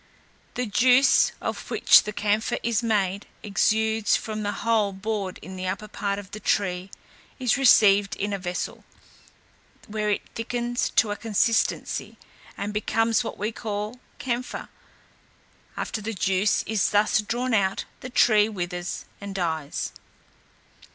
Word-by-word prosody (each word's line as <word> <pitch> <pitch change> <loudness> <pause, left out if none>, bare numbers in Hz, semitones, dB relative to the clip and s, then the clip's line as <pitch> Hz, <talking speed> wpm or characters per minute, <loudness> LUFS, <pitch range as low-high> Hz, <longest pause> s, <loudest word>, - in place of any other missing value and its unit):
The 250 - -1
juice, 250 +5 +4
of - - -4
which - - +6
the 210 - -3
camphire 210 +1 0
is 235 0 +1
made, 200 -4 0 0.2
exudes 220 +2 +2
from 215 -1 -3
a - - 0
hole 215 -3 +1
bored 195 -1 -3
in 185 0 -8
the 185 0 -4
upper 195 +3 -3
part 200 -1 -2
of 200 -1 -9
the 215 - -7
tree, 190 -2 0 0.5
is 250 -4 +2
received 205 -6 +5
in 205 +1 -2
a 200 - -2
vessel, 180 -1 -4 1.0
where 215 0 -2
it 205 - -1
thickens 240 +1 -2
to 215 - +4
a - - -1
consistency, 225 +1 0 0.4
and 205 +1 -4
becomes 225 +2 +1
what - - -6
we 210 +3 -2
call 215 +2 -5 0.2
camphire; 250 -1 -4 1.1
after 215 - -3
the 225 +2 -4
juice 190 +2 +1
is 220 -2 +1
thus 210 +1 +3
drawn 240 +4 -2
out, 195 -3 +1
the 255 - -7
tree 215 -4 +4
withers 175 -3 -4 0.2
and 200 -1 -7
dies. 160 -5 -2
210 Hz, 140 wpm, -25 LUFS, 195-225 Hz, 1.1 s, which